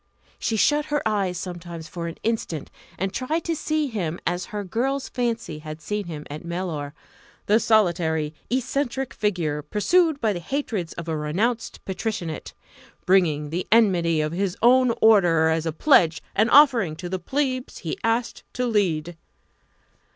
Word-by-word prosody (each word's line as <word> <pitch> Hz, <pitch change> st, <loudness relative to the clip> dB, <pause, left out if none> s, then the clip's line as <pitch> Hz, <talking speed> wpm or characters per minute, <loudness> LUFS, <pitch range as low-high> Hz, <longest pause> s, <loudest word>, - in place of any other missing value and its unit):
She 225 Hz, -, -1 dB
shut 295 Hz, +7 st, +3 dB
her 295 Hz, -6 st, -1 dB
eyes 195 Hz, -4 st, 0 dB
sometimes 175 Hz, -2 st, -7 dB
for 170 Hz, 0 st, -5 dB
an 165 Hz, -, -7 dB
instant 215 Hz, -9 st, -2 dB, 0.3 s
and 190 Hz, +1 st, -2 dB
tried 310 Hz, +6 st, -1 dB
to 335 Hz, -, -1 dB
see 310 Hz, 0 st, 0 dB
him 185 Hz, -, -3 dB
as 175 Hz, +1 st, -1 dB
her 210 Hz, -2 st, -5 dB
girl's 260 Hz, +8 st, -1 dB
fancy 230 Hz, -10 st, -2 dB
had 155 Hz, 0 st, -8 dB
seen 210 Hz, +5 st, -3 dB
him 150 Hz, -3 st, -7 dB
at 150 Hz, +3 st, -7 dB
Mellor 170 Hz, -4 st, -4 dB, 0.5 s
the 215 Hz, +2 st, +4 dB
solitary, 170 Hz, -9 st, +2 dB, 0.2 s
eccentric 265 Hz, +1 st, -1 dB
figure 170 Hz, -8 st, -1 dB
pursued 295 Hz, -, +2 dB
by 220 Hz, -4 st, +1 dB
the 175 Hz, -, -4 dB
hatreds 210 Hz, -, -3 dB
of 170 Hz, 0 st, -7 dB
a 160 Hz, -, -1 dB
renounced 200 Hz, +11 st, -2 dB
Patricianate 185 Hz, -4 st, -4 dB, 0.5 s
bringing 155 Hz, -6 st, +2 dB
the 175 Hz, +3 st, -3 dB
enmity 175 Hz, -8 st, +4 dB
of 150 Hz, 0 st, -1 dB
his 185 Hz, +1 st, -2 dB
own 250 Hz, +1 st, +6 dB
order 175 Hz, -7 st, +5 dB
as 160 Hz, 0 st, 0 dB
a -, -, 0 dB
pledge 165 Hz, -, +4 dB
and 215 Hz, +3 st, +3 dB
offering 240 Hz, -, +5 dB
to 175 Hz, +3 st, -6 dB
the 185 Hz, +1 st, -3 dB
Plebs 260 Hz, +1 st, -2 dB
he 160 Hz, -, -2 dB
asked 230 Hz, +1 st, 0 dB
to 250 Hz, -, -1 dB
lead. 175 Hz, -7 st, 0 dB
190 Hz, 160 wpm, -24 LUFS, 165-235 Hz, 0.5 s, own